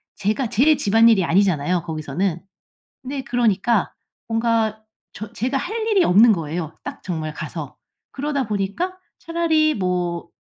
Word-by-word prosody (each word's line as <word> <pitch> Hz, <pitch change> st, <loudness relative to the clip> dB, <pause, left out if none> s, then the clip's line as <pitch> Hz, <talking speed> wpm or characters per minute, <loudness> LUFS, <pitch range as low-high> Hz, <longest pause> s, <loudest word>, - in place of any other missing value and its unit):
제가 215 Hz, +5 st, -1 dB
제 270 Hz, +7 st, +3 dB
집안일이 225 Hz, -2 st, +4 dB
아니잖아요 175 Hz, -2 st, +2 dB
거기서는. 160 Hz, +2 st, -2 dB, 0.6 s
근데 270 Hz, +1 st, -4 dB
그러니까 235 Hz, -3 st, +1 dB, 0.3 s
뭔가 225 Hz, -1 st, 0 dB, 0.3 s
저 215 Hz, +1 st, -8 dB
제가 260 Hz, +4 st, -1 dB
할 440 Hz, +8 st, -3 dB
일이 415 Hz, -4 st, +3 dB
없는 220 Hz, +6 st, +6 dB
거예요 160 Hz, -2 st, -4 dB
딱 -, -, -8 dB
정말 160 Hz, -4 st, -3 dB
가서. 155 Hz, -1 st, -7 dB, 0.3 s
그러다 280 Hz, -3 st, -2 dB
보니까 210 Hz, -, -2 dB, 0.2 s
차라리 320 Hz, -2 st, +1 dB
뭐 180 Hz, -3 st, -2 dB
215 Hz, 290 characters per minute, -21 LUFS, 180-260 Hz, 0.6 s, 없는